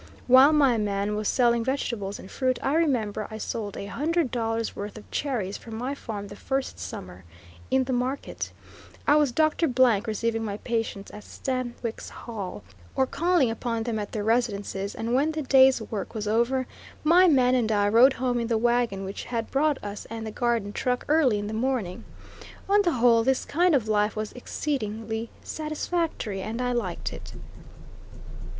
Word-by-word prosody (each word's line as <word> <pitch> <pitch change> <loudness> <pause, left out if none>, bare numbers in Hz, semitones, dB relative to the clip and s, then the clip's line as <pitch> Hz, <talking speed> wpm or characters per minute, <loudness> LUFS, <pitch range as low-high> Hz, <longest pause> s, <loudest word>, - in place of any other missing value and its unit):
While 260 +3 +8
my 275 -7 +4
man 205 0 -1
was 210 0 -2
selling 235 -2 +3
vegetables 230 -6 -2
and 190 - -12
fruit 255 -1 0
I 270 - +1
remember 240 -10 +1
I 220 - -6
sold 210 -2 -4
a - - -5
hundred 295 - 0
dollars 225 -2 -2
worth 205 +2 -6
of 215 - -13
cherries 230 -9 -2
from 225 -1 -9
my 255 +4 -2
farm 210 -7 -6
the 205 - -9
first 270 +4 -3
summer 90 0 -8 0.5
in 265 0 +3
the 260 0 -2
market, 255 +3 -2 0.5
I 290 - +5
was 295 -4 +3
Doctor 310 +4 +2
Blank 245 -6 +3
receiving 225 +1 -1
my 205 -2 -3
patients 225 -4 -3
at 210 - -10
Stanwix 245 -3 -4
Hall, 210 -6 -7 0.3
or 265 - +3
calling 325 -3 +2
upon 230 0 -2
them 225 -2 -2
at 205 - -5
their 210 - -3
residences; 205 -3 -1
and 230 +2 -2
when 290 +5 +2
the 310 -1 -3
day's 265 -1 +6
work 215 +1 -5
was 210 -1 -3
over, 235 +4 +1 0.4
my 350 +4 +6
man 255 -6 +4
and 235 -4 +2
I 205 -1 +3
rode 240 +6 +6
home 245 -1 -1
in 230 - -2
the 230 -1 +1
wagon 235 -4 +1
which 195 - -6
had 230 -2 -3
brought 290 +1 +2
us 205 0 -6
and 225 0 -5
the 220 - -5
garden 230 -3 -1
truck 250 -1 -1
early 295 -8 +4
in 205 - -3
the 210 - -4
morning. 225 -6 -2 0.6
On 405 +1 +5
the 345 -4 +1
whole, 235 -2 +4
this 265 +2 +1
kind 345 +1 +3
of 235 -5 +1
life 210 0 +1
was 215 -1 -3
exceedingly 225 -4 -3
satisfactory, 310 - -3
and 220 +4 -4
I 250 0 0
liked 220 -8 -2
it. - - -10
235 Hz, 180 wpm, -26 LUFS, 215-265 Hz, 0.6 s, While